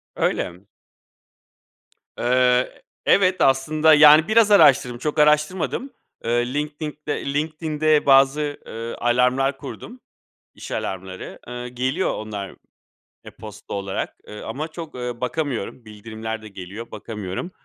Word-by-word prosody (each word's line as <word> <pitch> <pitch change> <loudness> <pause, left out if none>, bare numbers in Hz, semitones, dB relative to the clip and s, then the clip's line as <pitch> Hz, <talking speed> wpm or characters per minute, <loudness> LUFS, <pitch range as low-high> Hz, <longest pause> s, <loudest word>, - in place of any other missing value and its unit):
Öyle. 90 +1 -1 1.6
Eee, 125 +1 +2 0.2
evet, 185 -1 +3
aslında, 150 +4 +4
yani, 150 +1 +8
biraz 220 -1 +4
araştırdım, 125 -10 +5
çok 150 +4 -2
araştırmadım. 150 - +1 0.3
Eee, 120 +2 0
linktinkte 150 0 -4
LinkedIn'de, 140 - -2
LinkedIn'de 155 -1 0
bazı, 140 +2 +4
eee, 115 +1 -6
alarmlar 125 +3 +2
kurdum, 250 - -9 0.5
iş - - -10
alarmları. 95 0 -5
Eee, 125 0 -6
geliyor 130 +9 -1
onlar, 105 -2 -6 0.7
e-posta - - -10
olarak, 100 -1 -4
eee, 105 - -9
ama 140 +8 -5
çok, 160 -2 -9
eee, 125 -1 -5
bakamıyorum. 125 -4 -3
Bildirimler 110 +1 -7
de 110 - -10
geliyor. 100 +4 -9
Bakamıyorum. 105 - -6
130 Hz, 110 wpm, -22 LUFS, 115-150 Hz, 1.6 s, yani